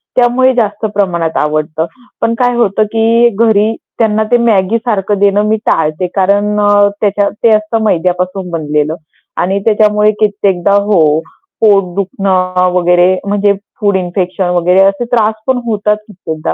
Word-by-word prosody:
त्यामुळे 255 +1 +3
जास्त 210 -2 -1
प्रमाणात 170 -5 -1
आवडतं. 155 +2 -1 0.4
पण 230 0 +1
काय 245 -1 +1
होतं 215 -2 +1
की 230 +1 +3
घरी 220 0 +1 0.3
त्यांना 220 -1 +1
ते 240 - +5
Maggi 205 +1 +2
सारखं 210 -4 -2
देणं 205 +1 +2
मी 220 - +1
टाळते. 155 +3 0
कारण 205 +2 +1
अ, 205 0 +3
त्याच्या 205 -1 +1
ते 230 - +5
असतं 215 +1 -2
मैद्यापासून 180 0 -1
बनलेलं 150 -1 -2 0.5
आणि 190 +3 -1
त्याच्यामुळे 210 -1 +3
कित्येकदा 200 -2 +1
हो, 200 -6 +2 0.6
पोट 195 -5 +3
दुखणं 185 -2 0
वगैरे 180 +1 +3
म्हणजे 205 0 +1 0.3
फूड 205 -2 +1
इन्फेक्शन 180 0 -2
वगैरे 180 +2 +2
असे 195 +4 +1
त्रास 220 -3 +2
पण 260 - +1
होतात 210 -1 0
कित्येकदा. 160 -6 -5
200 Hz, 140 wpm, -12 LUFS, 180-215 Hz, 0.6 s, ते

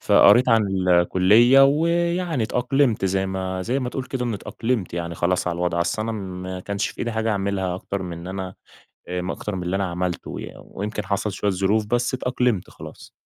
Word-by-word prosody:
فقريت 120 +6 +6
عن 95 -5 +2
الكلية 100 +9 +6
ويعني 170 +1 +1
اتأقلمت 125 -1 +1
زي 95 0 +1
ما 95 -1 -3
زي 120 +8 -1
ما 130 -2 -2
تقول 130 +1 -4
كده 130 -1 -3
إن 120 -2 -1
اتأقلمت 110 -1 -3
يعني 85 -1 -3
خلاص 90 +1 0
على 85 - -1
الوضع، 85 0 -1
أصل 85 +5 0
أنا 115 +1 -3
ما 95 -3 -6
كانش 100 +2 -2
في - - -13
إيدي 120 - -2
حاجة 110 0 0
أعملها 95 -3 -1
أكتر 95 +1 -4
من 85 -1 -7
أنا 95 0 -5 0.5
آآ 90 0 -3
أكتر 105 - -5
من 90 - -4
اللي 90 +2 -2
أنا 95 0 0
عملته 90 0 -3
يعن - - -9
ويمكن 105 +1 -5
حصل 100 +2 -1
شوية 100 +2 -1
ظروف 100 +3 +1
بس 120 +3 0
اتأقلمت 125 -5 0
خلاص. - - -12
100 Hz, 190 wpm, -23 LUFS, 90-120 Hz, 0.5 s, فقريت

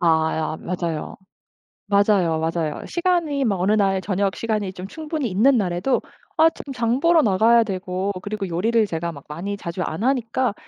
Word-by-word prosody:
아 160 -2 +3
야 160 0 -2
맞아요. 170 -3 -4 0.7
맞아요, 200 -5 +3
맞아요. 160 -1 -2
시간이 340 -6 0
막 200 -5 0
어느 190 +3 +2
날 195 -3 +2
저녁 195 0 -1
시간이 210 -4 -2
좀 185 +1 -7
충분히 310 0 -4
있는 250 +8 +4
날에도 190 +5 0 0.4
아 320 +1 +6
지금 280 - -9
장 240 0 0
보러 335 0 +5
나가야 225 +4 +4
되고 190 -1 -3
그리고 205 0 -4
요리를 215 +6 +1
제가 170 -2 -3
막 140 -3 -12
많이 185 +7 -5
자주 170 -1 -5
안 165 +4 -3
하니까 255 -2 +1
200 Hz, 335 characters per minute, -22 LUFS, 175-235 Hz, 0.7 s, 아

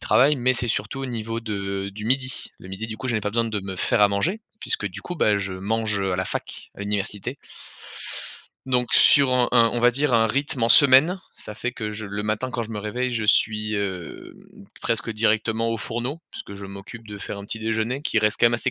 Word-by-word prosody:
travaillent 130 +8 +4
mais 125 +1 +2
c'est 120 -1 -1
surtout 110 +4 -2
au 135 - -3
niveau 115 -1 -4
de 100 -3 -3
du 105 +2 -8
midi. 130 +2 0
Le 95 - -12
midi 95 +4 -5
du 110 - -6
coup 130 - -5
je 120 - 0
n'ai 110 - 0
pas 105 - -2
besoin 115 +1 +1
de 110 -3 -3
me 95 -1 -6
faire - - +1
à 105 - +6
manger, 170 - -1 0.2
puisque 100 - -2
du 90 - -7
coup, 175 - -6
bah, 105 -10 +2
je 100 -1 -4
mange, 105 +2 -1
heu, 95 -1 -1
à - - -1
la 95 - -1
fac, - - -6
à - - -12
l'université. 105 +5 -3 1.3
Donc 125 -2 0
sur 140 -3 +6
un 125 -1 +3
un 115 -2 +5
on 120 - -1
va 120 +1 +5
dire 140 +2 +1
un 115 -1 +4
rythme 135 +1 -1
en 115 - +3
semaine, 140 - +8
ça 105 - -9
fait 125 +3 -4
que 105 -4 -5
je 110 0 -6
le 100 +1 -4
matin, 110 +4 -2
quand 120 - -3
je 115 - -7
me 105 - -4
réveille, 120 +5 -2
je 110 -2 -1
suis, 110 0 +2
heu, 95 -4 -5 0.5
presque 115 -1 -1
directement 110 +1 +1
aux 115 - -2
fourneaux, 120 +8 -4
puisque 100 - -9
je 100 0 -8
m'occupe 100 +4 -10
de 105 - -7
faire 100 0 -6
un 100 - -8
petit 110 - -3
déjeuner 115 +4 -2
qui 115 - +1
reste 105 -1 +1
quand - - +3
même 120 - +3
assez 130 +2 0
110 Hz, 240 wpm, -23 LUFS, 105-125 Hz, 1.3 s, semaine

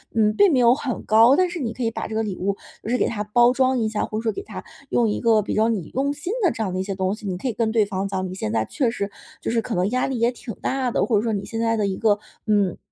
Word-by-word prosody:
嗯， 215 -1 +3
并 405 -3 +5
没 265 - +3
有 240 0 +6
很 265 -3 -3
高， 230 +5 +6
但 365 +2 +2
是 350 - -5
你 235 -5 -3
可 255 - -5
以 225 - +1
把 - - -4
这 220 - -6
个 220 - +1
礼 200 -3 -3
物 195 +2 -1 0.3
就 - - -5
是 250 - +2
给 - - +1
它 210 -2 -3
包 240 +3 +4
装 260 0 +2
一 220 -2 0
下， 215 -1 -1
或 215 - -5
者 225 - -3
说 225 - +1
给 395 - -6
它 - - -8 0.3
用 235 -2 +2
一 210 - -1
个 225 -2 +4
比 205 - -4
较 220 +1 +3
你 200 -8 -3
用 280 +2 0
心 295 +7 -4
的 360 - +4
这 225 - -3
样 185 -3 -3
的 185 - -2
一 - - 0
些 195 0 -4
东 190 0 0
西。 215 -1 -12
你 180 -2 -2
可 260 - -4
以 245 - -1
跟 225 0 0
对 220 -2 +3
方 195 -1 -3
讲， 190 -1 -2
你 - - -6
现 110 - -3
在 110 -1 +1
确 255 - 0
实 200 -3 -4 0.3
就 - - -2
是 230 -1 +1
可 225 0 -4
能 180 +2 +1
压 255 0 +1
力 260 -3 -2
也 235 +1 +3
挺 240 -2 -8
大 260 -2 -1
的， - - +1
或 225 - +2
者 205 - +1
说 225 - 0
你 200 -1 -2
现 225 - -5
在 230 0 +1
的 205 -2 +1
一 190 - -2
个， 210 -2 +2 0.3
嗯， 205 -4 +2
225 Hz, 360 characters per minute, -23 LUFS, 205-245 Hz, 0.3 s, 有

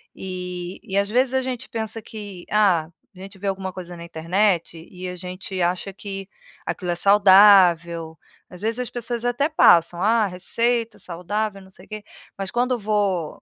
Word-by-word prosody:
e 180 -1 -6
e 190 - -6
às 200 0 +1
vezes 250 +3 +2
a 265 - +2
gente 255 0 -4
pensa 225 0 -4
que, 205 -5 -9
ah, 190 -7 +3 0.3
a - - -15
gente 195 +1 -10
vê 200 - -4
alguma 190 -1 -3
coisa 180 -1 -8
na 170 - -9
internet 170 +1 0
e 185 0 -8
a 180 - -6
gente 185 +1 -7
acha 180 +3 -1
que 195 0 -8 0.4
aquilo 180 -2 -3
é - - -1
saudável. 185 -4 +5 0.3
Às 180 0 -12
vezes 225 +3 -1
as 250 -2 -3
pessoas 240 0 -4
até 245 +5 +1
passam, 175 - +4
"Ah, 220 +1 +3
receita 230 +5 -1
saudável, 195 +4 -4
não 190 - -16
sei 185 0 -15
quê", 215 -1 -8 0.3
mas 195 -1 -4
quando 245 +1 +1
vou, 200 -6 -1
195 Hz, 175 wpm, -22 LUFS, 180-215 Hz, 0.4 s, saudável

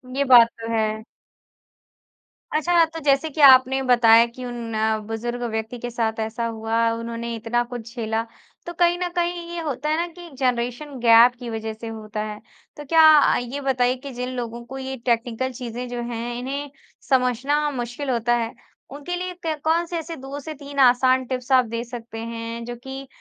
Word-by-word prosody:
ये 280 - +2
बात 240 -3 +8
तो 225 0 -5
है। 220 -1 -1 1.5
अच्छा, 335 +2 +3
तो 325 0 -8
जैसे 280 +2 +2
कि 305 +1 -3
आपने 265 -1 +7
बताया 235 -2 +6
कि 240 +2 -10
उन 240 -2 -6 0.4
बुज़ुर्ग 240 +2 -4
व्यक्ति 220 +2 -4
के 245 - -5
साथ 225 -2 -2
ऐसा 220 +1 -2
हुआ, 225 0 0
उन्होंने 230 0 -5
इतना 230 +2 -1
कुछ 240 -1 -9
झेला। 225 -1 -1 0.4
तो 345 - -6
कहीं 350 0 +4
न 360 - -1
कहीं 345 0 -1
ये 345 - -3
होता 295 -2 -3
है 310 - +2
ना 340 +1 -1
कि 345 0 -12
जनरेशन 250 +3 -1
गैप 235 +1 +6
की 245 -2 -6
वजह 220 0 -4
से 225 +1 -9
होता 215 -1 -6
है। 210 -1 -6 0.4
तो 295 - -8
क्या 315 0 +6
ये 245 +4 -4
बताइए 255 -2 +1
कि 280 - -6
जिन 250 +1 -4
लोगों 235 -1 -5
को 265 +3 -8
ये 265 0 -5
टेक्निकल 240 +1 0
चीज़ें 245 0 -6
जो 240 0 -4
हैं 235 +1 -4
इन्हें 280 +3 -4 0.4
समझना 265 +3 +2
मुश्किल 245 +2 -4
होता 240 -1 +1
है, 230 -1 -2 0.4
उनके 290 +6 -5
लिए 365 +1 -4
क 315 -1 -1
कौन-से 335 +2 +1
ऐसे 330 0 -5
2 270 0 -7
से 310 +2 -7
3 285 -1 -8
आसान 255 0 +5
टिप्स 250 +1 -5
आप 255 -1 +5
दे 230 +1 -4
सकते 235 -2 -9
हैं 230 0 -5
जो 240 0 -6
कि, 265 +3 -9
245 Hz, 185 wpm, -23 LUFS, 230-280 Hz, 1.5 s, बात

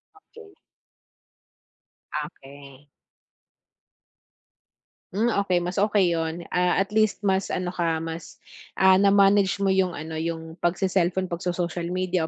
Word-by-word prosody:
Okey. 415 0 -17 1.6
Okey. 140 -2 -9 2.3
Hmm, 225 +5 +1
okey, 185 -3 +1
mas 180 +2 -3
okey 200 -3 +3
yun, 165 +1 -2
ah, 180 0 +2
at 195 - -17
least 215 -1 +1
mas 190 -1 +1
ano 180 -1 -3
ka, 170 -2 0
mas, 165 0 -7 0.4
ah, 190 0 +5
na-manage 200 0 +4
mo 195 - +3
yung 190 -2 +1
ano, 160 +1 -6
yung 160 0 -5
pagce-cellphone, 185 0 0
pagso-social 175 0 -3
media 180 -2 -1
180 Hz, 110 wpm, -25 LUFS, 165-195 Hz, 2.3 s, ah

